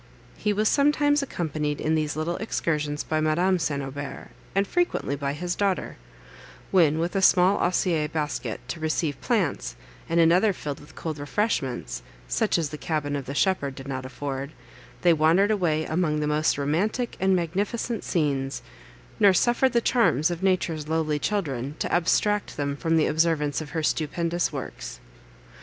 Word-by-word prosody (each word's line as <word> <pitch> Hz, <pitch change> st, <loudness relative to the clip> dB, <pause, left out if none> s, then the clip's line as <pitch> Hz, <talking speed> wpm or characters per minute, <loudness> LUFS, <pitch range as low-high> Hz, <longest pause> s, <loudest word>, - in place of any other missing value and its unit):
He 210 Hz, -, 0 dB
was 210 Hz, +1 st, +1 dB
sometimes 290 Hz, +1 st, +3 dB
accompanied 155 Hz, -, -2 dB
in 155 Hz, -, 0 dB
these 155 Hz, -2 st, 0 dB
little 160 Hz, +3 st, -2 dB
excursions 150 Hz, -8 st, -1 dB
by 155 Hz, 0 st, -1 dB
Madame 175 Hz, +4 st, +2 dB
St. 140 Hz, -4 st, -1 dB
Aubert, 140 Hz, +1 st, -7 dB, 0.3 s
and 195 Hz, +1 st, +3 dB
frequently 350 Hz, -, 0 dB
by 140 Hz, 0 st, -2 dB
his 175 Hz, +4 st, -3 dB
daughter; 195 Hz, -1 st, -1 dB, 0.8 s
when, 160 Hz, -5 st, +4 dB
with 170 Hz, +4 st, -2 dB
a 195 Hz, -, +2 dB
small 185 Hz, +1 st, +5 dB
osier 175 Hz, -3 st, +1 dB
basket 150 Hz, -1 st, -3 dB
to 170 Hz, -, -4 dB
receive 155 Hz, -2 st, -1 dB
plants, -, -, 0 dB, 0.3 s
and 165 Hz, +1 st, +2 dB
another 180 Hz, +5 st, +5 dB
filled 145 Hz, -5 st, -5 dB
with 145 Hz, -, -16 dB
cold 155 Hz, -3 st, -5 dB
refreshments, 135 Hz, -, -2 dB, 0.3 s
such -, -, +1 dB
as 160 Hz, -3 st, -1 dB
the 150 Hz, -, -7 dB
cabin 150 Hz, -3 st, -2 dB
of 140 Hz, -2 st, -4 dB
the 140 Hz, -, -5 dB
shepherd 145 Hz, -7 st, +1 dB
did 135 Hz, 0 st, -9 dB
not 130 Hz, -1 st, -4 dB
afford, 135 Hz, +2 st, -5 dB, 0.5 s
they 175 Hz, -1 st, +6 dB
wandered 165 Hz, +7 st, +4 dB
away 160 Hz, -6 st, +1 dB
among 155 Hz, -2 st, 0 dB
the 150 Hz, -, 0 dB
most 150 Hz, 0 st, +1 dB
romantic 190 Hz, -, -1 dB
and 190 Hz, 0 st, +3 dB
magnificent 200 Hz, +7 st, -2 dB
scenes, 140 Hz, -5 st, -1 dB, 0.6 s
nor 200 Hz, -2 st, +6 dB
suffered 240 Hz, +5 st, +3 dB
the 235 Hz, -, +3 dB
charms 175 Hz, -, +3 dB
of 170 Hz, 0 st, -4 dB
Nature's 170 Hz, -5 st, 0 dB
lowly 155 Hz, -2 st, 0 dB
children 145 Hz, -, -2 dB
to -, -, -3 dB
abstract 205 Hz, +4 st, +1 dB
them 140 Hz, -1 st, -1 dB
from 165 Hz, +3 st, +1 dB
the 155 Hz, -, +4 dB
observance 155 Hz, -2 st, +1 dB
of 155 Hz, -, -7 dB
her 160 Hz, 0 st, -3 dB
stupendous 170 Hz, +3 st, 0 dB
works. -, -, -6 dB
160 Hz, 165 wpm, -25 LUFS, 145-185 Hz, 0.8 s, they